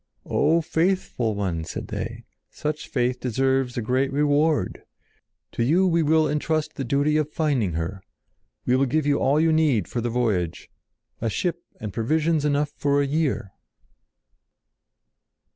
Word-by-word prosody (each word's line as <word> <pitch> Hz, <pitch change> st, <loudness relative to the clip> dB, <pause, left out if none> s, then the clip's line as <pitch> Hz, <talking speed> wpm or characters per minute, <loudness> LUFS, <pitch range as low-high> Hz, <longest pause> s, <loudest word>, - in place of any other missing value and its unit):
"O 165 Hz, +2 st, +2 dB
faithful 160 Hz, -, 0 dB
one!" 90 Hz, -5 st, -2 dB
said -, -, -6 dB
they. -, -, -5 dB, 0.3 s
"Such 150 Hz, 0 st, -4 dB
faith 125 Hz, -1 st, 0 dB
deserves 130 Hz, +1 st, 0 dB
a 120 Hz, -, -1 dB
great 130 Hz, +4 st, +1 dB
reward. 145 Hz, -, +1 dB, 0.7 s
To 115 Hz, -, -1 dB
you 170 Hz, +10 st, +3 dB
we 170 Hz, -2 st, +3 dB
will 155 Hz, 0 st, +3 dB
entrust 150 Hz, +1 st, -1 dB
the 135 Hz, -, -4 dB
duty 140 Hz, +4 st, +1 dB
of 155 Hz, -1 st, -1 dB
finding 135 Hz, -, 0 dB
her. 85 Hz, +4 st, -3 dB, 0.6 s
We 125 Hz, -, +3 dB
will 135 Hz, +1 st, +2 dB
give 155 Hz, +4 st, 0 dB
you 145 Hz, -1 st, +2 dB
all 140 Hz, +3 st, +3 dB
you 160 Hz, 0 st, +3 dB
need 145 Hz, -, +2 dB
for 120 Hz, -, -3 dB
the 120 Hz, -, -1 dB
voyage—a 110 Hz, 0 st, -3 dB
ship 170 Hz, -, -2 dB, 0.2 s
and 105 Hz, -3 st, -6 dB
provisions 155 Hz, -, +1 dB
enough 145 Hz, 0 st, +1 dB
for 140 Hz, 0 st, +2 dB
a 140 Hz, -, +2 dB
year!" 140 Hz, -, -1 dB
140 Hz, 145 wpm, -24 LUFS, 120-155 Hz, 0.7 s, you